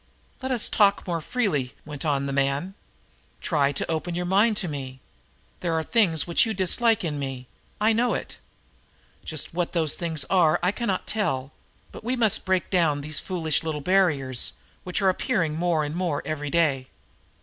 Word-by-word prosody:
"Let 260 0 -3
us 245 -4 +1
talk 200 -2 +3
more 170 -3 -2
freely," 155 - -1
went 150 0 -7
on 140 -2 +1
the 140 - -3
man. 140 +7 0 0.7
"Try 145 -5 +1
to 145 - -2
open 160 +2 -2
your 175 0 -2
mind 205 +4 +3
to 195 - 0
me. 135 -4 -6 0.6
There 170 -2 -1
are 160 - 0
things 175 -7 +2
which 170 - +3
you 220 -1 -1
dislike 215 +4 +2
in 150 -4 -2
me; 135 -2 -5 0.3
I 215 +2 +3
know 240 +2 +2
it. - - -6 0.8
Just 155 -1 -4
what 175 0 -1
those 160 -4 +2
things 160 -5 -2
are 175 -5 +3
I 180 - +3
cannot 205 -4 -2
tell, 140 -11 -1 0.4
but - - -10
we 245 +3 -1
must 225 -5 +2
break 185 -1 0
down 160 -6 +2
these 155 +1 -2
foolish 165 -5 0
little 160 -2 -3
barriers 145 -8 +2 0.3
which 180 +2 -2
are 190 - +5
appearing 185 -5 0
more 165 -1 +1
and 145 0 -3
more 170 -5 -1
every 150 -2 -3
day. 140 -5 +1
165 Hz, 180 wpm, -25 LUFS, 145-190 Hz, 0.8 s, are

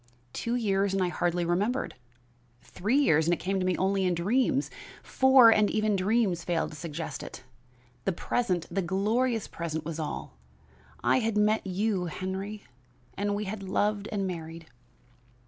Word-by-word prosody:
Two 235 +1 -2
years 200 -4 +1
and 190 - +2
I 180 - +1
hardly 175 0 0
remembered; 205 +10 0 0.7
three 215 +9 -1
years 160 - +3
and 175 - +3
it - - -14
came 195 +1 -1
to 185 - -1
me 185 - +1
only 195 +1 +1
in 180 -1 +1
dreams; 255 - +1 0.3
four 265 -3 +6
and 210 -2 +4
even 215 -1 +1
dreams 195 -2 +1
failed 170 -2 -1
to - - -10
suggest 165 0 -5
it; 130 - -9 0.6
the 195 - +2
present, 180 -1 -1
the 195 +3 0
glorious 215 +6 0
present 160 -2 -4
was 165 0 -5
all. 150 - -5 0.6
I 130 +2 +4
had 220 -1 -1
met 210 0 +2
you, 195 0 0
Henry, 190 +4 -5 0.5
and 205 0 -1
we 210 - -2
had 205 +1 -5
loved 205 +2 -1
and 200 -2 -1
married. 165 -2 -6
195 Hz, 165 wpm, -28 LUFS, 175-215 Hz, 0.7 s, four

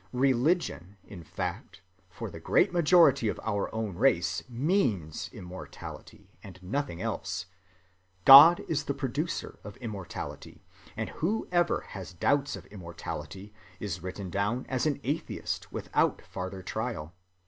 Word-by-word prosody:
Religion, 125 - +1
in 90 -4 -11
fact, - - -5 0.3
for - - -7
the - - -9
great - - +2
majority 165 -7 +5
of - - -2
our 100 -2 -1
own 110 -4 -3
race 90 -6 +2
means 120 - 0
immortality, 90 +1 -10
and 95 -2 -11
nothing 125 -1 -3
else. 90 - -3 0.8
God 150 +6 +11
is 150 -2 -1
the 140 - -2
producer 145 +4 -3
of 105 - -9
immortality; 105 -7 -7 0.3
and - - -2
whoever 175 -1 +1
has 95 -2 -8
doubts 140 - +1
of - - -10
immortality 95 +2 -7 0.3
is 100 -4 -4
written 95 +1 -6
down 105 +7 -1
as 130 +3 0
an 145 -2 0
atheist 145 +6 -3
without - - 0
farther 95 +1 -6
trial. 110 -7 -4
110 Hz, 125 wpm, -29 LUFS, 95-145 Hz, 0.8 s, God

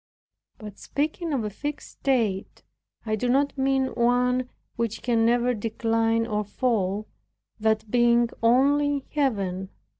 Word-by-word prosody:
By 215 -1 -8
speaking 310 - -3
of 265 -6 0
a 210 - -3
fixed 290 +7 -6
state, 225 -8 -1 0.4
I 215 -1 0
do 245 +3 -2
not 280 +3 +2
mean 270 -1 +1
one 250 +1 +1 0.3
which 230 -2 -3
can 230 -2 +2
never 245 +1 +2
decline 225 +1 0
or 210 -2 -1
fall, 210 -2 -1 0.5
that 220 -1 0
being 240 -1 +4
only 285 +5 +3
in 280 - -4
Heaven. 195 - -1
235 Hz, 130 wpm, -25 LUFS, 215-265 Hz, 0.5 s, being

